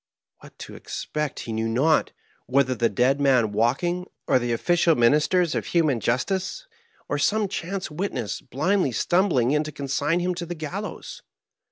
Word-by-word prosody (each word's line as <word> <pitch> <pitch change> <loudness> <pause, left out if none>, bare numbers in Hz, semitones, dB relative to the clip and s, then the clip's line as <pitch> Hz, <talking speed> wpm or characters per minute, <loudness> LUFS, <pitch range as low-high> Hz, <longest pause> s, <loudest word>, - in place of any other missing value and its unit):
What - - -16
to - - -9
expect 150 -2 -4
he 115 - -5
knew 110 +1 -1
not, 145 +7 +2 0.4
whether 130 0 +2
the 120 -2 +1
dead 125 +7 +1
man 125 -6 +3
walking, 155 - 0 0.2
or - - +3
the 120 -1 -2
official 165 +6 +2
ministers 150 +7 +3
of - - -2
human 155 -8 +2
justice, 190 - -1 0.4
or 145 - -2
some 210 +6 +2
chance 190 -1 -4
witness 150 - -3
blindly 145 +3 0
stumbling 170 - +2
in 150 +1 +2
to 155 - -6
consign 145 +4 -1
him 180 +1 0
to 175 0 -5
the 175 - -5
gallows. 155 -2 -6
150 Hz, 160 wpm, -24 LUFS, 125-175 Hz, 0.4 s, man